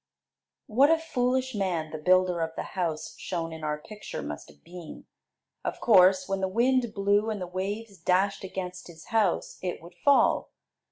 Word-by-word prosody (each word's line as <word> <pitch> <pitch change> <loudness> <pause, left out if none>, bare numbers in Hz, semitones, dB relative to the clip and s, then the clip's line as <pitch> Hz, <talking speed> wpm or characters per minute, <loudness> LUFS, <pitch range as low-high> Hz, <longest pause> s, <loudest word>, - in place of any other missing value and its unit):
What 265 +7 +4
a 325 - +5
foolish 260 -5 0
man 180 -6 -1
the 155 - -5
builder 180 +1 +3
of 165 0 -3
the - - -3
house 165 -4 -2
shown 165 -3 -3
in 160 -1 -9
our 150 0 -1
picture 210 +7 -8
must 75 0 -7
have 75 -1 -20
been! 175 -3 -10 0.6
Of - - -3
course, 185 -4 +5
when 195 0 -2
the 190 - +1
wind 240 +3 +2
blew 205 +2 +2
and 215 -2 -2
the 180 - -3
waves 195 +3 -5
dashed 190 +4 +1
against 185 -1 -6
his 160 -2 -13
house, 210 -6 +1
it 180 -1 -3
would 170 +2 -13
fall. 285 -1 +4
185 Hz, 175 wpm, -28 LUFS, 170-215 Hz, 0.6 s, a